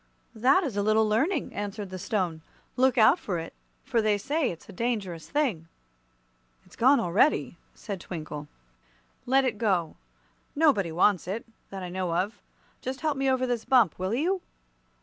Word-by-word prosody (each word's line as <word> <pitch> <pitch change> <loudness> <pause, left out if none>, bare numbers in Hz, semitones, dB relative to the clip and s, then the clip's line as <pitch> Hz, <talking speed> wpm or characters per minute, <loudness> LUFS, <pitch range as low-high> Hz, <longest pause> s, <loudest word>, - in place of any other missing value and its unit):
"That 260 - +3
is 265 -10 -3
a 205 - +1
little 215 +1 +3
Learning," 275 - 0
answered 205 -1 -5
the 185 - -6
Stone. 180 -5 -2 0.3
"Look 260 +1 +3
out 220 - +6
for 180 -4 -3
it, 165 0 -6 0.3
for 240 -4 +1
they 215 -1 +2
say 285 +6 0
it's 165 - -9
a - - -10
dangerous 195 -6 -3
thing." 245 - 0 1.0
"It's - - -18
gone 265 +4 +5
already," 190 - +2 0.2
said 200 -5 -6
Twinkle. 155 -4 -7 0.8
"Let 265 +1 +4
it 230 -5 -2
go. 185 -8 0 0.6
Nobody 280 - +3
wants 180 +2 +2
it, 210 +5 -4 0.2
that 195 -1 -7
I 180 - -5
know 180 -2 -2
of. 190 +6 -2 0.4
Just 260 +1 -5
help 310 -2 0
me 270 0 +1
over 260 -1 +2
this 240 -3 -1
bump, 235 - +3
will 185 +4 -1
you?" 360 +8 0
215 Hz, 170 wpm, -27 LUFS, 185-260 Hz, 1.0 s, out